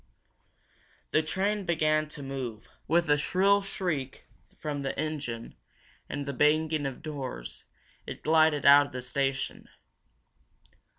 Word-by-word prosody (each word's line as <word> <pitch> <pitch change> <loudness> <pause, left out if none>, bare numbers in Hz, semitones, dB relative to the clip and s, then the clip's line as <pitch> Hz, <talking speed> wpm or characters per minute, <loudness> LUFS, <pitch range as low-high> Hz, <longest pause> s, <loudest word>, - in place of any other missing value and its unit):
The 155 - +4
train 195 +6 -1
began 155 -3 +1
to 150 -1 -9
move. 130 -5 -5 0.2
With 170 +1 +3
a 145 0 +3
shrill 195 +6 +3
shriek 165 -9 -3 0.3
from 145 -2 -4
the 135 - -3
engine, 145 -7 -4 0.6
and 145 - -4
the 140 - -3
banging 150 +1 +2
of 135 +3 -7
doors, - - -6 0.4
it - - -7
glided 155 -2 +4
out 145 0 +8
of - - -17
the 125 0 -5
station. 135 +1 -2
150 Hz, 125 wpm, -29 LUFS, 135-160 Hz, 0.6 s, out